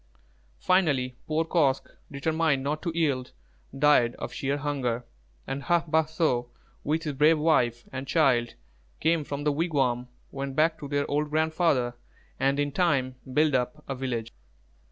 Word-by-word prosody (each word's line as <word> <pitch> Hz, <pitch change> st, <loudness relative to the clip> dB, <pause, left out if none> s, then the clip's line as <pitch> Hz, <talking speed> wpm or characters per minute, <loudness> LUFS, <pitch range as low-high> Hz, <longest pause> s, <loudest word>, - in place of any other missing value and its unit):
Finally, 140 Hz, -, +1 dB
poor 160 Hz, +1 st, +1 dB
Kosq', 145 Hz, -6 st, +1 dB, 0.2 s
determined 155 Hz, 0 st, 0 dB
not 150 Hz, +2 st, -2 dB
to 170 Hz, -, -2 dB
yield, 140 Hz, -6 st, 0 dB, 0.4 s
died 135 Hz, -5 st, +4 dB
of -, -, -6 dB
sheer 140 Hz, +1 st, -1 dB
hunger, 130 Hz, -5 st, -2 dB, 0.4 s
and 135 Hz, +1 st, -4 dB
Hā 170 Hz, -1 st, +2 dB
bāh 160 Hz, 0 st, +2 dB
so, 130 Hz, -7 st, 0 dB, 0.3 s
with 155 Hz, +3 st, 0 dB
his 150 Hz, -3 st, -2 dB
brave 150 Hz, +4 st, +4 dB
wife 125 Hz, -7 st, +1 dB
and 130 Hz, 0 st, -5 dB
child, 130 Hz, -6 st, +2 dB, 0.4 s
came 160 Hz, 0 st, +2 dB
from 145 Hz, 0 st, -5 dB
the 150 Hz, -, +2 dB
wigwam, 135 Hz, -6 st, 0 dB, 0.2 s
went 135 Hz, -1 st, -5 dB
back 160 Hz, +2 st, +2 dB
to 145 Hz, -, -6 dB
their 145 Hz, 0 st, 0 dB
old 150 Hz, +1 st, 0 dB
grandfather, 155 Hz, -5 st, +1 dB, 0.5 s
and 135 Hz, +2 st, +2 dB
in 145 Hz, 0 st, 0 dB
time 140 Hz, -6 st, +1 dB, 0.2 s
built 150 Hz, +2 st, +3 dB
up 130 Hz, +4 st, -1 dB
a 135 Hz, -, -2 dB
village. 125 Hz, -4 st, -3 dB
145 Hz, 155 wpm, -27 LUFS, 130-160 Hz, 0.5 s, died